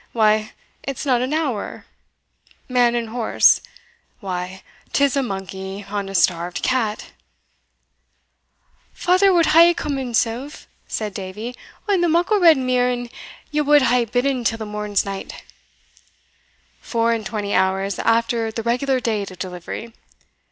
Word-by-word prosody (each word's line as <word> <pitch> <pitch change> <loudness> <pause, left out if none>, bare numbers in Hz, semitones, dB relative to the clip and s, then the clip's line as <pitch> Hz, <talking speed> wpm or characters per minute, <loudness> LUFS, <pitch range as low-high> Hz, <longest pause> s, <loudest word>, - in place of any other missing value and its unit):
why, 215 -1 +2 0.3
it's 275 +1 -5
not 250 -3 +2
an 255 +2 -2
hour 295 -9 -2 0.8
Man 245 -2 +3
and 235 -2 -2
horse? 230 0 +3 0.6
why, 185 -1 -5 0.3
'tis 280 -1 +2
a 275 - +2
monkey 195 -2 -6
on 200 -1 -3
a 195 - -6
starved 175 0 +1
cat!" 225 -5 -1 1.8
"Father 370 +2 +3
wad 345 -2 +4
hae 340 +1 +7
come 290 -4 -3
himsell," 245 +1 -1 0.4
said 210 -2 -4
Davie, 210 +6 -6 0.3
"on 395 -3 +2
the 345 - +2
muckle 355 +6 +2
red 330 -4 +7
mear, 255 -1 +1
an 245 -1 -4 0.4
ye 300 0 +1
wad 295 -1 +5
hae 245 -1 +3
bidden 245 +2 0
till 225 -1 0
the 220 - -5
morn's 210 -1 -1
night." 195 -1 -7 1.4
"Four 230 0 0
and 225 -1 -2
twenty 205 -1 -3
hours 190 +1 +1
after 230 0 +1
the 225 0 -5
regular 255 +3 +1
date 215 -5 -2
of 185 - -12
delivery! 185 +5 -7
230 Hz, 135 wpm, -21 LUFS, 205-265 Hz, 1.8 s, hae